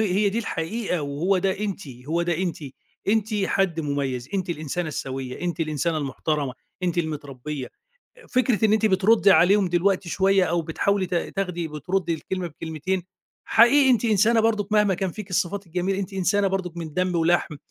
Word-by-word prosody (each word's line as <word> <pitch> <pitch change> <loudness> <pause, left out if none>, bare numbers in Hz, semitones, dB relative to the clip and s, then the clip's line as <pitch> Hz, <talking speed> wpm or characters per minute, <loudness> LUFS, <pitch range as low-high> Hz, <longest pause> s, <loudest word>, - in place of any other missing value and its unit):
هي 200 0 +2
دي 205 +4 -1
الحقيقة، 185 -3 -2
وهو 155 +7 0
ده 190 +1 0
أنتِ، 200 -6 -4 0.2
هو 170 +2 +1
ده 170 -2 0
أنتِ. 180 -4 -1 0.5
أنتِ 220 0 +1
حد 190 -4 0
مميز، 140 -4 -2
أنتِ 185 -2 -1
الإنسانة 160 +1 -3
السويّة، 130 -3 -5
أنتِ 175 -1 -3
الإنسانة 155 +1 0
المحترمة، 145 0 -2 0.3
أنتِ 175 -1 0
المتربية. 145 -3 -4 0.5
أ 475 - -17
فكرة 250 -3 +1
إن 215 - +4
أنتِ 220 0 +3
بتردي 200 +2 +4
عليهم 190 +3 +5
دلوقتي 180 +1 +1
شوية 195 +1 +3
أو 170 -1 0
بتحاولي 190 +4 0
تا 175 -1 -1
تاخدي، 180 -4 -3
بتردي 170 +3 -1
الكلمة 180 +3 -4
بكلمتين، 165 +3 -3 0.4
حقيقي 265 +4 +5
أنتِ 240 -3 +3
إنسانة 225 +1 +4
برضو 215 -3 +1
مهما 210 -2 +3
كان 185 0 -2
فيكِ 210 +1 -9
الصفات 185 +2 -1
الجميلة، 180 +3 -1
أنتِ 195 0 -4
إنسانة 195 +2 +1
برضو 190 -3 -2
من 165 -2 -6
دم 185 0 0
ولحم، 165 -2 +1
180 Hz, 170 wpm, -24 LUFS, 160-200 Hz, 0.5 s, عليهم